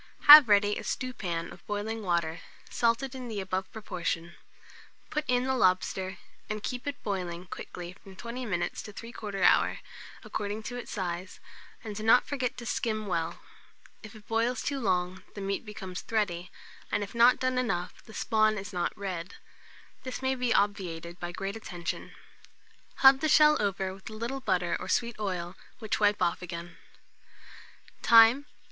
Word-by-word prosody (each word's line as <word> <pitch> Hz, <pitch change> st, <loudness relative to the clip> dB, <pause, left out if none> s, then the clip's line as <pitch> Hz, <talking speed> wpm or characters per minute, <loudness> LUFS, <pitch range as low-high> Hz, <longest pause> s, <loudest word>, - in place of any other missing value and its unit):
Have 295 Hz, -4 st, +11 dB
ready 205 Hz, 0 st, +4 dB
a -, -, -6 dB
stewpan 185 Hz, -10 st, -3 dB
of 175 Hz, -, -16 dB
boiling 210 Hz, +2 st, -3 dB
water, 170 Hz, -4 st, -1 dB, 0.3 s
salted 235 Hz, +3 st, +1 dB
in 255 Hz, -2 st, -7 dB
the 215 Hz, -3 st, -4 dB
above 190 Hz, 0 st, -3 dB
proportion; 170 Hz, -5 st, -4 dB, 0.8 s
put 300 Hz, -, -1 dB
in 250 Hz, 0 st, +2 dB
the 265 Hz, 0 st, 0 dB
lobster, 185 Hz, -3 st, +1 dB, 0.3 s
and 215 Hz, 0 st, -4 dB
keep 250 Hz, +2 st, -4 dB
it 285 Hz, -, -4 dB
boiling 180 Hz, -4 st, -3 dB
quickly 175 Hz, -1 st, -8 dB
from 190 Hz, 0 st, -15 dB
20 235 Hz, +5 st, -6 dB
minutes 175 Hz, -4 st, -2 dB
to 210 Hz, -, -10 dB
3/4 210 Hz, -4 st, -5 dB
hour, -, -, +4 dB, 0.5 s
according 210 Hz, +1 st, -4 dB
to 245 Hz, -, -6 dB
its 245 Hz, -, -7 dB
size, 185 Hz, -2 st, -4 dB, 0.4 s
and 215 Hz, -3 st, -6 dB
do 215 Hz, -, -5 dB
not 225 Hz, +3 st, +5 dB
forget 255 Hz, -3 st, -2 dB
to 240 Hz, -, -7 dB
skim 215 Hz, -2 st, -1 dB
well. 165 Hz, -4 st, -2 dB, 0.6 s
If 215 Hz, +1 st, -11 dB
it 210 Hz, -1 st, -15 dB
boils 230 Hz, +2 st, 0 dB
too 280 Hz, -1 st, -2 dB
long, 185 Hz, -4 st, 0 dB
the 200 Hz, -, -6 dB
meat 195 Hz, +3 st, -2 dB
becomes 190 Hz, -3 st, -6 dB
thready, 185 Hz, -6 st, -1 dB, 0.4 s
and 205 Hz, -1 st, 0 dB
if 200 Hz, -, -8 dB
not 235 Hz, +2 st, +6 dB
done 255 Hz, -1 st, +1 dB
enough, 180 Hz, -8 st, -2 dB
the 220 Hz, -, -13 dB
spawn 215 Hz, -1 st, +2 dB
is 200 Hz, 0 st, -6 dB
not 175 Hz, -1 st, -2 dB
red: 185 Hz, -2 st, -5 dB, 0.7 s
this 255 Hz, 0 st, -6 dB
must 260 Hz, 0 st, 0 dB
be 250 Hz, -2 st, 0 dB
obviated 180 Hz, -5 st, -1 dB
by 175 Hz, 0 st, -4 dB
great 195 Hz, +3 st, -4 dB
attention. 180 Hz, -5 st, -6 dB, 0.9 s
Hub 265 Hz, 0 st, +8 dB
the 310 Hz, -, 0 dB
shell 300 Hz, 0 st, +7 dB
over 195 Hz, -2 st, -1 dB
with 195 Hz, +2 st, -10 dB
a -, -, -9 dB
little 235 Hz, +5 st, -4 dB
butter 185 Hz, -7 st, 0 dB
or -, -, -7 dB
sweet 235 Hz, -2 st, 0 dB
oil, 180 Hz, -3 st, -3 dB, 0.2 s
which 220 Hz, -2 st, -2 dB
wipe 205 Hz, -1 st, +3 dB
off 170 Hz, -, 0 dB
again. 170 Hz, -1 st, -7 dB, 1.2 s
Time. 230 Hz, +5 st, +7 dB
205 Hz, 165 wpm, -29 LUFS, 185-235 Hz, 1.2 s, Have